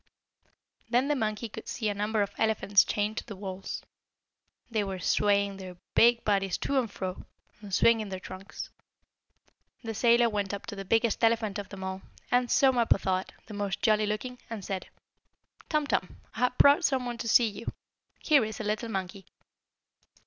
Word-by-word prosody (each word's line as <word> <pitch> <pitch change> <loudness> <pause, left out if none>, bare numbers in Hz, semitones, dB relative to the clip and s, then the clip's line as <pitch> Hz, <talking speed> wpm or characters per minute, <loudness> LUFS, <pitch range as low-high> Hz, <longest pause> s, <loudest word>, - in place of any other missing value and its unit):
Then 250 +4 +2
the 295 - +2
monkey 215 -2 -2
could 215 - -10
see 220 - -2
a 205 - +1
number 210 +1 0
of 200 - -5
elephants 215 -3 +4
chained 210 +1 -1
to - - -2
the 210 - -9
walls. 190 0 -6 0.9
They 215 -2 +1
were 195 -1 -4
swaying 200 +2 +1
their 185 -2 -9 0.2
big 235 0 +5
bodies 195 -3 +1
to 275 -1 0
and 240 -4 -2
fro, 185 -2 -6 0.3
and 205 -2 -10
swinging 220 +1 +3
their 190 -1 -5
trunks. 185 +2 -8 1.1
The 225 -1 -4
sailor 235 +2 +4
went 205 -2 -2
up 200 - -9
to 210 - -6
the 195 0 -6
biggest 225 +3 +1
elephant 225 -3 +2
of 200 - -7
them 195 -1 -8
all, 190 0 -4 0.3
and, 245 0 +3
so 270 -1 +5
Mappo 235 -5 +3
thought, 190 -1 -1
the 215 - -10
most 205 -1 -3
jolly 215 -1 +3
looking, 245 +4 -4
and 215 -4 -6
said: 190 -2 -4 0.8
"Tum 305 -1 +1
Tum, 185 -9 -2
I - - -8
have 250 0 +1
brought 285 +5 +6
some 265 -5 +1
one 240 -1 -4
to 230 - -4
see 235 +2 +6
you. 215 +2 -5 0.5
Here 295 -6 +5
is 215 -1 -5
a - - -3
little 215 +2 -2
monkey." 190 -1 -5
215 Hz, 185 wpm, -29 LUFS, 195-235 Hz, 1.1 s, brought